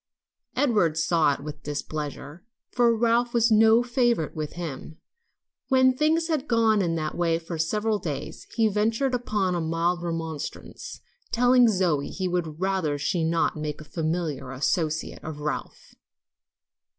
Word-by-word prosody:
Edward 205 Hz, -, +2 dB
saw 165 Hz, -3 st, +2 dB
it -, -, -11 dB
with 150 Hz, +1 st, -8 dB
displeasure, 150 Hz, +2 st, -5 dB, 0.3 s
for 240 Hz, -1 st, +3 dB
Ralph 235 Hz, +1 st, +1 dB
was 230 Hz, 0 st, +3 dB
no 220 Hz, +2 st, +6 dB
favorite 240 Hz, -, 0 dB
with 155 Hz, -1 st, -4 dB
him. 160 Hz, -2 st, -7 dB, 0.7 s
When 260 Hz, -1 st, +4 dB
things 315 Hz, +4 st, +2 dB
had 305 Hz, -4 st, -1 dB
gone 225 Hz, -2 st, +3 dB
on -, -, +2 dB
in 170 Hz, -3 st, 0 dB
that 155 Hz, -1 st, -3 dB
way 165 Hz, -2 st, +1 dB
for 165 Hz, 0 st, -6 dB
several 210 Hz, +6 st, 0 dB
days, 145 Hz, -7 st, -6 dB
he 225 Hz, -2 st, +3 dB
ventured 225 Hz, +6 st, 0 dB
upon 210 Hz, -6 st, 0 dB
a 175 Hz, -, -1 dB
mild 165 Hz, +2 st, 0 dB
remonstrance, 165 Hz, -3 st, -6 dB, 0.3 s
telling 245 Hz, +1 st, +5 dB
Zoe 180 Hz, -9 st, +1 dB
he 190 Hz, -1 st, -3 dB
would 170 Hz, -3 st, -2 dB
rather 185 Hz, -6 st, 0 dB
she 170 Hz, +3 st, -1 dB
would 160 Hz, -, +1 dB
not 165 Hz, -1 st, +1 dB
make 150 Hz, -1 st, -4 dB
a -, -, -9 dB
familiar 155 Hz, -3 st, -3 dB
associate 155 Hz, +4 st, -2 dB
of 155 Hz, -2 st, -6 dB
Ralph. 150 Hz, 0 st, -5 dB
175 Hz, 150 wpm, -26 LUFS, 155-225 Hz, 0.7 s, no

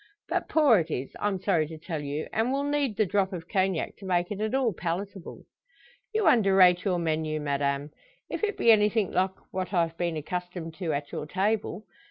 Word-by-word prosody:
But -, -, -1 dB
poor 285 Hz, -, +5 dB
it 165 Hz, 0 st, -3 dB
is 135 Hz, -3 st, -4 dB
I'm 205 Hz, -2 st, 0 dB
sorry 175 Hz, -5 st, +1 dB
to 160 Hz, +1 st, -8 dB
tell 160 Hz, -1 st, -5 dB
you 145 Hz, +1 st, -4 dB
and 225 Hz, +3 st, +1 dB
will 275 Hz, +1 st, 0 dB
need 285 Hz, -6 st, 0 dB
the 215 Hz, -, +3 dB
drop 195 Hz, +1 st, +1 dB
of 170 Hz, -2 st, -6 dB
Cognac 190 Hz, -3 st, 0 dB
to 200 Hz, -, -11 dB
make 175 Hz, -1 st, 0 dB
it 205 Hz, 0 st, -4 dB
at 220 Hz, +4 st, 0 dB
all 255 Hz, -5 st, +2 dB
palatable." 180 Hz, +2 st, -5 dB, 0.7 s
"You 435 Hz, -1 st, 0 dB
underrate 190 Hz, -5 st, +5 dB
your 185 Hz, -3 st, +1 dB
menu, 155 Hz, -2 st, -1 dB
madame; 140 Hz, 0 st, -1 dB, 0.4 s
if -, -, -5 dB
it 420 Hz, -1 st, 0 dB
be 230 Hz, -, +5 dB
anything 210 Hz, -1 st, +3 dB
like 190 Hz, +1 st, +1 dB, 0.2 s
what 185 Hz, +1 st, -3 dB
I've 165 Hz, -1 st, +1 dB
been 170 Hz, -2 st, -1 dB
accustomed 175 Hz, +1 st, -5 dB
to 170 Hz, -4 st, -1 dB
at 145 Hz, -1 st, -3 dB
your 150 Hz, -, -5 dB
table. 200 Hz, +2 st, -1 dB
185 Hz, 200 wpm, -27 LUFS, 160-210 Hz, 0.7 s, poor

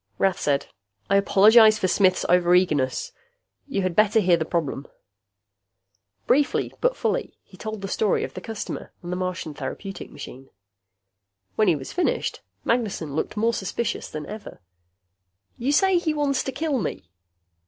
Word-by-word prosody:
Rath 190 Hz, -2 st, +1 dB
said, 140 Hz, -1 st, 0 dB, 0.5 s
"I 200 Hz, -, +6 dB
apologize 215 Hz, +3 st, +6 dB
for 190 Hz, -, 0 dB
Smith's 185 Hz, 0 st, +3 dB
over 175 Hz, 0 st, +4 dB
eagerness. 150 Hz, -8 st, +1 dB, 0.6 s
You 200 Hz, -9 st, -1 dB
had 185 Hz, -2 st, -1 dB
better 215 Hz, +2 st, +4 dB
hear 180 Hz, -4 st, +4 dB
the 160 Hz, -1 st, -2 dB
problem." 155 Hz, -5 st, -2 dB, 1.4 s
Briefly 285 Hz, +2 st, +1 dB
but -, -, +2 dB
fully, -, -, -2 dB
he 190 Hz, -, -18 dB
told 215 Hz, +1 st, -6 dB
the -, -, -2 dB
story 205 Hz, +1 st, +1 dB
of -, -, -5 dB
the 185 Hz, -, -7 dB
customer 220 Hz, +1 st, -6 dB
and 175 Hz, -, -5 dB
the -, -, -1 dB
Martian 185 Hz, -4 st, -3 dB
therapeutic 195 Hz, +6 st, -6 dB
machine. 130 Hz, +1 st, -10 dB, 1.1 s
When 215 Hz, -, +3 dB
he 175 Hz, -, +4 dB
was 135 Hz, -2 st, -7 dB
finished, 360 Hz, -, -1 dB, 0.2 s
Magnessen 205 Hz, -, -1 dB
looked 160 Hz, -, -3 dB
more 230 Hz, +2 st, +2 dB
suspicious 210 Hz, +3 st, -3 dB
than 155 Hz, -1 st, -6 dB
ever. 210 Hz, +4 st, -9 dB, 1.0 s
"You 255 Hz, +4 st, 0 dB
say 380 Hz, +4 st, +4 dB
he 315 Hz, -3 st, -1 dB
wants 280 Hz, -3 st, +1 dB
to 265 Hz, -, -2 dB
kill 280 Hz, 0 st, -1 dB
me?" 145 Hz, -, -5 dB
195 Hz, 155 wpm, -24 LUFS, 175-230 Hz, 1.4 s, I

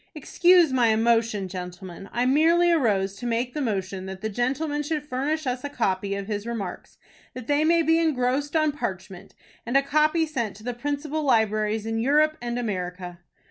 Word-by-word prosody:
"Excuse 345 Hz, +1 st, +4 dB
my 245 Hz, -3 st, +3 dB
emotion, 225 Hz, -2 st, +2 dB
gentlemen. 180 Hz, +1 st, -8 dB
I 240 Hz, +2 st, 0 dB
merely 330 Hz, +6 st, +4 dB
arose 205 Hz, -, +1 dB
to 245 Hz, -, -5 dB
make 240 Hz, +2 st, -1 dB
the 300 Hz, -, -3 dB
motion 195 Hz, -5 st, -3 dB
that 190 Hz, 0 st, -8 dB
the 220 Hz, -, -2 dB
gentleman 275 Hz, +7 st, -1 dB
should 295 Hz, 0 st, -3 dB
furnish 295 Hz, +4 st, -2 dB
us 250 Hz, 0 st, -2 dB
a 285 Hz, -, -3 dB
copy 200 Hz, -6 st, -1 dB
of 200 Hz, 0 st, -4 dB
his 205 Hz, +1 st, -4 dB
remarks, 205 Hz, -6 st, -6 dB, 0.4 s
that 255 Hz, -2 st, -7 dB
they 290 Hz, +3 st, +2 dB
may 335 Hz, +1 st, +3 dB
be 325 Hz, +1 st, +3 dB
engrossed 285 Hz, -1 st, 0 dB
on 310 Hz, -1 st, +3 dB
parchment, 190 Hz, -9 st, -6 dB, 0.3 s
and 240 Hz, +4 st, +1 dB
a 275 Hz, -, +3 dB
copy 305 Hz, +3 st, +2 dB
sent 240 Hz, -9 st, -3 dB
to 215 Hz, -, -14 dB
the 245 Hz, +1 st, -3 dB
principal 290 Hz, +4 st, -3 dB
libraries 220 Hz, -4 st, +1 dB
in 225 Hz, 0 st, -2 dB
Europe 300 Hz, +5 st, +3 dB
and 240 Hz, 0 st, -3 dB
America." 180 Hz, -5 st, -4 dB
245 Hz, 180 wpm, -25 LUFS, 205-295 Hz, 0.4 s, Excuse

